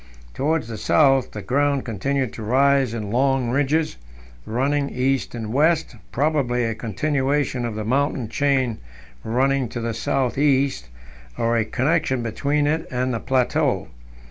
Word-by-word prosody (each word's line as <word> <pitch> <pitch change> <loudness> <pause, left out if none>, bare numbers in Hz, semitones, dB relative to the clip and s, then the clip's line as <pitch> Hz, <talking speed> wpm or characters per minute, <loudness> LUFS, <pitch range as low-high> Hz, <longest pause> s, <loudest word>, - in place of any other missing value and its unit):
Towards 155 -2 0
the 115 -2 -6
south 135 -4 +3
the 105 - -8
ground 140 +4 +1
continued 130 +3 -2
to - - -8
rise 135 +2 +3
in 105 -3 -4
long 130 0 +1
ridges 145 - 0 0.5
running 140 +5 0
east 130 0 -1
and 110 -1 -5
west, 155 0 +2 0.2
probably 135 -4 +1
a 115 -1 -1
continuation 130 +4 -1
of 115 -2 -4
the 110 -1 -4
mountain 135 0 0
chain 130 -2 0 0.4
running 130 +2 +1
to 120 - -5
the 115 0 -2
south 130 +3 -1
east, 135 - +1 0.5
or 115 0 +1
a 115 - +2
connection 130 -1 0
between 145 +6 0
it 160 +2 0
and 125 0 -1
the 115 - -2
plateau. 130 0 0
130 Hz, 145 wpm, -22 LUFS, 115-140 Hz, 0.5 s, south